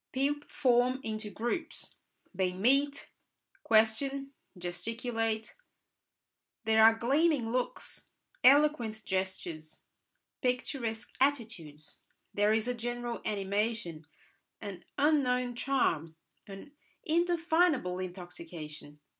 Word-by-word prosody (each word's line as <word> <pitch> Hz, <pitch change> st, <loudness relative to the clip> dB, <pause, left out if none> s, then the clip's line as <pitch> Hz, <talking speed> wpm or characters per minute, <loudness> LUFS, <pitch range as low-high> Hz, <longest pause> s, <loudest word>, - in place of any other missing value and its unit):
People 285 Hz, +2 st, -1 dB
form 255 Hz, -1 st, +3 dB
into 215 Hz, -1 st, -4 dB
groups; 240 Hz, -, -4 dB, 0.4 s
they 185 Hz, -1 st, 0 dB
meet, 275 Hz, +9 st, +1 dB, 0.5 s
question, 270 Hz, +6 st, +2 dB, 0.2 s
gesticulate; 225 Hz, +5 st, -3 dB, 1.1 s
there 220 Hz, 0 st, +5 dB
are 225 Hz, 0 st, +8 dB
gleaming 270 Hz, +1 st, +2 dB
looks, 250 Hz, 0 st, -3 dB, 0.4 s
eloquent 255 Hz, -6 st, +4 dB
gestures, 185 Hz, -5 st, -4 dB, 0.6 s
picturesque 250 Hz, -3 st, -2 dB
attitudes; 215 Hz, -, -1 dB, 0.3 s
there 205 Hz, +1 st, +3 dB
is 220 Hz, +1 st, +1 dB
a 250 Hz, -, +1 dB
general 240 Hz, 0 st, -4 dB
animation, 200 Hz, -5 st, -2 dB, 0.5 s
an 200 Hz, -4 st, -7 dB
unknown 255 Hz, -4 st, +2 dB
charm, 170 Hz, -, 0 dB, 0.3 s
an 195 Hz, +8 st, -10 dB, 0.3 s
indefinable 335 Hz, -, +2 dB
intoxication. 170 Hz, -5 st, -8 dB
230 Hz, 85 wpm, -31 LUFS, 195-270 Hz, 1.1 s, are